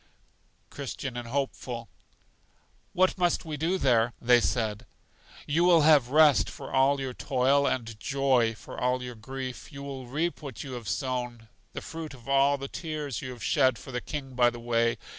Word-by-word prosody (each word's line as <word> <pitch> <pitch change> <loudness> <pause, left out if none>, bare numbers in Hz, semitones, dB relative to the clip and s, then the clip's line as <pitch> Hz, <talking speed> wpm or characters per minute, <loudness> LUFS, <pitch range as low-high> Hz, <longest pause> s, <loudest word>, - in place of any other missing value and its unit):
Christian 135 -2 -5
and 120 -1 -5
Hopeful. 125 -2 -3 1.1
What 185 +1 +2
must 175 -2 +1
we 155 -2 -4
do 165 +6 0
there? 120 -6 +2
They 120 0 +5
said: 110 -2 -1 0.6
You 160 +4 +1
will 175 -2 +6
have 145 -5 +5
rest 145 -7 +5
for - - -9
all 135 +1 +4
your 130 -2 -4
toil, 135 +3 +2
and 115 -4 -3
joy 130 -3 +2
for - - -9
all 125 0 +1
your 125 0 -6
grief. 130 +4 -7
You 140 -1 -8
will 135 -3 -7
reap 160 +8 -2
what 135 -7 -7
you 135 - -8
have 120 -4 -6
sown 125 -4 -3 0.2
the - - -5
fruit 160 -3 -7
of 120 -2 -17
all 140 +1 +4
the 135 0 -6
tears 150 - -4
you 130 -1 -6
shed 130 +1 +2
for 135 - -10
the 125 -1 -3
King 135 -3 -6
by 120 -1 +4
the 120 0 -9
way. 115 0 +1
130 Hz, 180 wpm, -28 LUFS, 120-140 Hz, 1.1 s, will